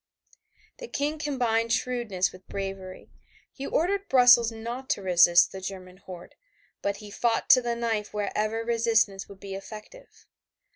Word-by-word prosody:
The - - -7
King 300 -4 -2
combined 235 -6 0
shrewdness 230 -6 -1
with 185 0 -16
bravery. 195 -1 -7 0.4
He 275 - -6
ordered 395 +4 -1
Brussels 245 -3 +6
not 235 +4 -7
to - - 0
resist 175 -1 +5
the 190 - -8
German 185 -1 -8
horde, 185 -2 -11 0.5
but 200 0 -2
he 210 0 -11
fought 235 +2 +1
to 255 - +7
the 240 -1 -2
knife 225 -3 -2
wherever 215 +2 -2
resistance 225 -4 +1
would 200 -1 -13
be 195 -1 -8
effective. 215 - -11
225 Hz, 145 wpm, -26 LUFS, 195-245 Hz, 0.5 s, to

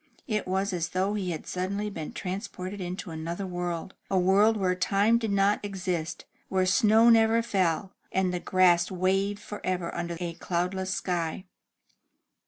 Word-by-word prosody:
It 210 -3 -1
was 190 +1 0
as 170 -2 -1
though 190 +2 0
he 195 -4 -2
had 160 -3 -4
suddenly 195 +3 -2
been 160 -5 -6
transported 190 0 -5
into 180 0 -5
another 165 +4 -4
world, 175 -1 -4 0.2
a 195 - +1
world 200 +4 +4
where 185 -2 +1
time 200 +5 +2
did 225 -3 -2
not 200 +1 +3
exist, 180 -5 -3 0.2
where 190 -1 +2
snow 220 +3 +5
never 225 0 +4
fell, 190 -3 0 0.2
and 185 -1 +1
the 180 - -1
grass 175 -1 +3
waved 195 +2 0
forever 185 -5 -3
under 170 0 -3
a 175 -2 -3
cloudless 180 +2 -2
sky. 175 -1 -2
185 Hz, 155 wpm, -28 LUFS, 175-200 Hz, 0.2 s, snow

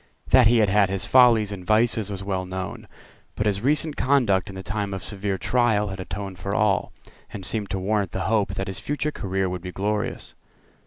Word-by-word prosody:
That 130 -3 +7
he 120 +1 +4
had 105 -3 +3
had 100 -1 +3
his 95 -1 -2
follies 115 -3 +5
and 95 -3 -6
vices 110 +1 +2
was 100 -1 -5
well 95 -2 -2
known. 95 0 -6 0.5
But 105 - -2
his 100 -2 0
recent 150 +4 +1
conduct 115 -9 +2
in 95 - -9
the 95 - -7
time 100 +1 -3
of 95 - -6
severe 100 -1 -3
trial 110 0 +1
had 95 0 -6
atoned 95 0 -6
for 100 0 -3
all, 105 -2 +1 0.4
and 95 - -7
seemed 105 0 -1
to 95 - -2
warrant 100 +1 0
the - - -3
hope 105 -1 0
that 95 - -2
his 95 -1 -4
future 145 +1 -2
career 95 -6 -2
would 90 -1 -4
be 90 0 -6
glorious. 105 +3 -3
100 Hz, 210 wpm, -24 LUFS, 95-110 Hz, 0.5 s, That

